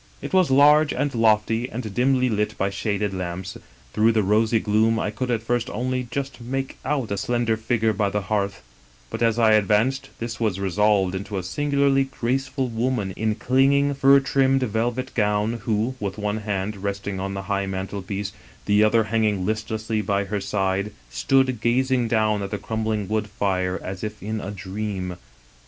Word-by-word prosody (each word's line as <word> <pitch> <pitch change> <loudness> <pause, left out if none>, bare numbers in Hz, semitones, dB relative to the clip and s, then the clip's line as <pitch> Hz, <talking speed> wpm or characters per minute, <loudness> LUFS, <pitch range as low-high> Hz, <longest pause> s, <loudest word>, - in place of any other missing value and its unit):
" - - -29
It - - -6
was 185 -4 +4
large 145 +2 +6
and 145 +2 -1
lofty 115 +1 +2
and 110 -3 -5
dimly 130 +1 +2
lit 105 -2 -1
by 100 +1 0
shaded 100 0 -2
lamps; 90 0 -5 0.4
through 110 +2 +3
the 110 -1 +2
rosy 110 +3 +3
gloom 110 +2 +2
I 105 - -1
could 130 +3 -4
at 115 -2 0
first 120 +1 -1
only 125 +2 -2
just 135 -1 -4
make 135 +3 -4
out 135 -6 -1
a 100 - -1
slender 120 +1 0
figure 110 0 0
by 100 0 0
the 105 +1 -1
hearth; 100 0 -2 0.5
but - - -5
as 115 -1 +2
I 115 -2 +5
advanced, 110 +6 +2
this 115 -1 -5
was 105 -5 0
resolved 100 0 +2
into 100 +1 -4
a 95 - -3
singularly 140 +5 +1
graceful 130 +1 -2
woman 115 -3 -1
in 110 +3 -1
clinging, 140 +4 +3
fur 140 0 +6
trimmed 135 -1 +2
velvet 120 +3 -2
gown, 105 +1 0
who, 110 +2 0
with 100 -1 -4
one 105 0 -1
hand 105 -1 -3
resting 100 0 -4
on 95 +1 -3
the 95 - -4
high 100 0 -1
mantelpiece, 95 +1 -4 0.3
the 105 +1 +4
other 110 +1 +4
hanging 105 -3 0
listlessly 110 +1 -2
by 100 0 0
her 100 +1 -3
side, 100 0 -1 0.2
stood 130 - +1
gazing 125 +1 +2
down 110 -2 +1
at 100 - -4
the 105 - -3
crumbling 110 0 -2
wood 110 +1 -1
fire 95 -2 -1
as 95 +1 -6
if 105 -1 -6
in 110 +1 -3
a 95 - -5
dream. 95 -1 -4
110 Hz, 180 wpm, -23 LUFS, 100-125 Hz, 0.5 s, large